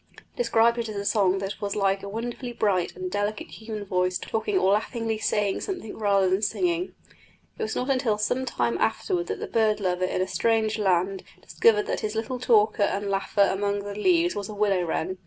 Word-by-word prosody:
He - - -21
described 235 - +3
it 230 -1 -3
as 215 - -6
a 200 0 -4
song 195 -3 +2
that 195 +1 -5
was 200 -1 -2
like 195 -1 +1
a 200 - -7
wonderfully 240 +3 -5
bright 195 -6 0
and 370 -1 -5
delicate 205 - -2
human 215 -2 -7
voice 180 -1 0
talking 380 - -2
or 195 - +3
laughingly 225 +1 -1
saying 205 -2 0
something 365 - -5
rather 200 -3 +2
than 190 +2 +1
singing. 350 - -1 0.6
It - - -5
was 220 - -2
not 255 +2 0
until 250 -5 +1
some 215 +5 0
time 120 - -1
afterwards 180 -5 0
that - - -3
the - - -3
bird 220 -2 +1
lover 185 -2 0
in 185 - -2
a 185 - 0
strange 220 -1 +1
land 190 -1 +1 0.2
discovered 210 -2 +2
that - - -2
his 215 0 -3
little 235 +3 -3
talker 215 -3 +3
and 200 0 0
laugher 200 +1 +2
among 200 +1 -1
the 205 0 -5
leaves 340 - +2
was 200 -1 -4
the 215 - -8
willow 200 -3 +2
wren. 185 +3 -2
210 Hz, 210 wpm, -26 LUFS, 195-225 Hz, 0.6 s, described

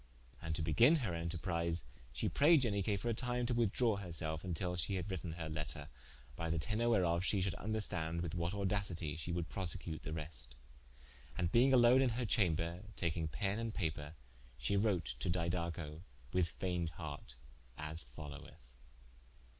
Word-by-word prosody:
And 80 -1 -2
to 80 - -1
begin 115 - +6
her 120 - -1
enterprise, 85 0 -1 0.3
shee - - -1
prayde 150 0 +5
Ianique 100 -2 +1
for 120 - -3
a - - +2
time 125 +1 0
to 120 - 0
withdrawe 115 -1 +2
her 95 -3 -6
selfe, 80 -1 -1
vntill 90 0 -2
shee 100 +4 0
had 95 +2 -3
written 85 -3 -3
her 80 -1 -4
letter, 75 -1 -4 0.5
by 85 +4 -2
the 80 - +1
tenor 105 +9 +1
whereof 90 -6 +3
shee 100 +1 +2
should 95 -1 +1
vnderstande 85 -7 -1
with 85 -3 -3
what 85 0 0
audacitie 95 -6 -1
shee 85 - -4
would 85 -1 -1
prosecute 85 -3 -3
the - - -5
reste: 75 -6 -4 0.8
and 85 0 +1
being 125 +3 +6
alone 125 0 +7
in 130 - +4
her 120 +1 -1
chamber, 85 -5 +2 0.2
takinge 80 -2 0
penne 100 +2 0
and 115 -1 -3
paper, 80 -4 -2 0.4
she 65 +10 0
wrote 95 - +1
to 90 - -1
Didaco, 85 -2 -1 0.3
with 90 -2 +3
fayned 90 -1 -2
hart 70 -6 -7 0.4
as 75 +1 -2
followeth. 65 -1 -10
85 Hz, 170 wpm, -37 LUFS, 80-100 Hz, 0.8 s, alone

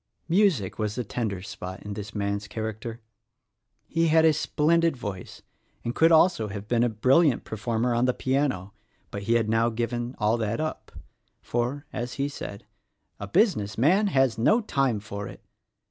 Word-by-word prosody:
Music 170 - +2
was 105 -1 -1
the 125 - -2
tender 105 -4 -3
spot 95 -2 -7
in 105 - -5
this 105 0 -7
man's 100 0 -2
character. 110 +2 -5 0.9
He 165 0 +1
had 160 0 +5
a 160 - +7
spllendid 165 +2 +2
voice, 100 -6 -7 0.4
and 120 - -2
could 165 +4 +4
also 165 -6 +4
have 100 0 -7
been 120 0 +2
a 120 - +2
brilliant 130 +6 +3
performer 115 +2 -1
on 120 +1 +2
the 125 - +2
piano, 130 -8 -1 0.4
but 100 - -5
he 115 +4 0
had 115 -2 +2
now 115 +1 +2
given 120 +2 -3
all 110 +2 +2
that 115 +1 -2
up; 155 0 -4 0.5
for, 125 +5 -2
as 120 +1 -4
he 140 0 -1
said, 100 -8 -7 0.5
"A 100 - -5
business 105 - +1
man 185 - +4
has 135 - +2
no 215 - +4
time 135 - 0
for 100 -1 -6
it!" - - -12
120 Hz, 170 wpm, -26 LUFS, 105-145 Hz, 0.9 s, a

